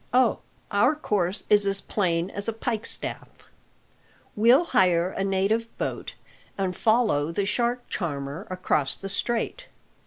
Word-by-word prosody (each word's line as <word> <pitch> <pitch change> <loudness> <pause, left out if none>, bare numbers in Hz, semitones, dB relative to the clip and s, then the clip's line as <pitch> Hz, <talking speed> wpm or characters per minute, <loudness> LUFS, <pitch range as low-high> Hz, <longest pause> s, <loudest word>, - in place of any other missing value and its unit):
"Oh, 250 -4 +4 0.3
our 205 +9 +3
course 200 - -1
is 205 -1 +4
as 195 0 0
plain 180 -3 -1
as 200 +1 0
a 225 - 0
pikestaff. 225 0 -4 1.1
We'll 240 +9 +5
hire 185 - +2
a 195 - -3
native 195 +4 +1
boat, - - -4 0.4
and 190 -2 -1
follow 220 -10 +2
the 195 +4 -1
shark 240 +4 -1
charmer 145 0 -4
across 180 -6 +2
the 195 - -7
Strait. 240 - -1
200 Hz, 130 wpm, -25 LUFS, 180-230 Hz, 1.1 s, We'll